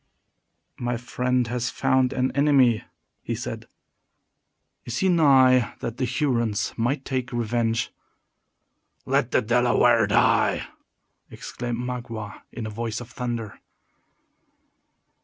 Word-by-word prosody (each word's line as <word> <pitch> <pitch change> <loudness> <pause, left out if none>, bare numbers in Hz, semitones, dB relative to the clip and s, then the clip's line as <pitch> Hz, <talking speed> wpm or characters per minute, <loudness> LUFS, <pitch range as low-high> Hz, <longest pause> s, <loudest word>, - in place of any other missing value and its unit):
"My 120 -1 -1
friend 125 +1 -1
has 120 +1 -2
found 130 -1 +1
an 130 0 0
enemy," 135 -5 +3 0.4
he - - -3
said. - - -6 1.2
"Is 120 - -5
he 190 - +2
nigh 130 -7 +4
that 115 +1 -4
the 130 - 0
Hurons 120 -5 0
might 130 +4 -1
take 130 -2 -3
revenge?" 115 -1 -1 1.1
"Let - - +1
the - - +2
Delaware 120 -1 +3
die!" 105 - +2 0.6
exclaimed 120 -1 -5
Magua, 120 -4 -6
in 115 - -6
a - - -4
voice 115 +1 -4
of 125 0 -10
thunder. 120 -5 -5
120 Hz, 110 wpm, -24 LUFS, 115-130 Hz, 1.2 s, nigh